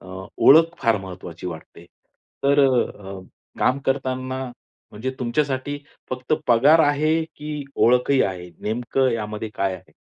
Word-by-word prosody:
अ, - - -15 0.3
ओळख 165 +4 +6
फार 115 -2 +3
महत्वाची 90 -3 -9
वाटते. 85 0 -9 0.6
तर 140 +1 +4
अ, 100 -6 -2 0.4
काम 130 - +2
करतांना 130 -1 -2 0.5
म्हणजे 110 +5 -4
तुमच्यासाठी 135 +2 -1 0.3
फक्त 130 +1 -4
पगार 140 +7 +5
आहे 155 +2 +2
की 150 -1 -5
ओळखही 125 +3 +3
आहे? 90 -2 -4
नेमकं 120 +4 0
यामध्ये 105 -1 -4
काय 95 -1 -1
आहे? - - -14
130 Hz, 125 wpm, -22 LUFS, 105-140 Hz, 0.6 s, ओळख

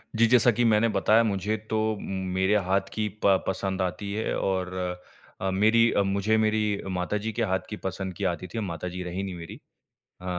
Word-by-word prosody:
जी, 115 +1 +5
जैसा 120 0 +5
कि 120 +2 0
मैंने 110 0 +4
बताया 110 +2 +4
मुझे 105 0 0
तो 110 -1 0
मेरे 95 +1 -1
हाथ 95 +1 +1
की 110 -1 -1 0.2
प 95 -2 +4
पसंद 95 0 -1
आती 100 +2 -3
है 110 +2 -1
और 95 -1 -1 0.7
अ, 95 - 0
मेरी 110 +4 +4
मुझे 100 +3 +1
मेरी 110 -1 +1 0.2
माता 90 +4 -1
जी 110 +2 -3
के 115 - -1
हाथ 95 -2 +1
की 105 - -5
पसंद 95 0 -3
की 100 - -6
आती 85 +2 -6
थी, 110 - -5
माता 90 -3 -4
जी 90 +1 -5
रही 90 +2 -4
नहीं 95 -2 -5
मेरी। 85 -1 -9 0.6
अ, - - -10
100 Hz, 195 wpm, -26 LUFS, 95-110 Hz, 0.7 s, जी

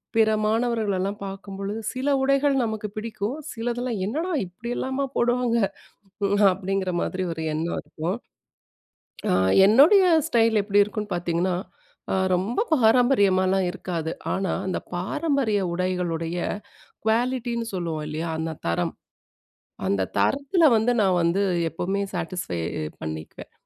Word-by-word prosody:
பிற 220 -1 +5 0.2
மாணவர்களெல்லாம் 215 -3 0
பார்க்கும்பொழுது, 195 +2 -5
சில 260 +3 -1
உடைகள் 275 +1 +3
நமக்கு 220 -2 -3
பிடிக்கும். 220 +4 -3 0.2
சிலதெல்லாம், 240 -1 -2
"என்னடா 315 - -2
இப்படி 190 +7 -9
எல்லாமா 265 +1 -1
போடுவாங்க?" 240 0 +2 1.0
அப்படிங்கிற 190 0 -2
மாதிரி 185 - -2
ஒரு 160 - -5
எண்ணம் 165 +2 -2
இருக்கும். 170 +6 -3 1.1
அ - - +3 0.3
என்னுடைய 300 - +7 0.2
ஸ்டைல் 225 -6 +3
எப்படி 205 0 +4
இருக்கும்ன்னு 210 -1 -4
பார்த்தீங்கன்னா, 175 +1 0 0.6
அ - - +2 0.2
ரொம்ப 195 +7 -1 0.2
பாரம்பரியமாலாம் 200 -7 +4
இருக்காது. 170 -4 -4 0.2
ஆனா, 190 -2 -1
அந்த 185 - -1 0.2
பாரம்பரிய 230 - 0
உடைகளுடைய 175 -2 -2 0.7
குவாலிட்டின்னு 235 0 0
சொல்லுவோம் 165 -4 -3
இல்லையா? 155 +2 -3
அந்த 160 0 -2 0.2
தரம், 85 - 0 0.9
அந்த 100 0 +1 0.2
தரத்தில 285 +5 +2
வந்து 220 +3 +2
நான் 185 -2 +3
வந்து, 170 +4 +2 0.3
எப்பவுமே 190 +5 -2
சாட்டிஸ்ஃபை 170 - -3 0.4
பண்ணிக்குவேன். 80 0 -7
200 Hz, 110 wpm, -24 LUFS, 180-240 Hz, 1.1 s, என்னுடைய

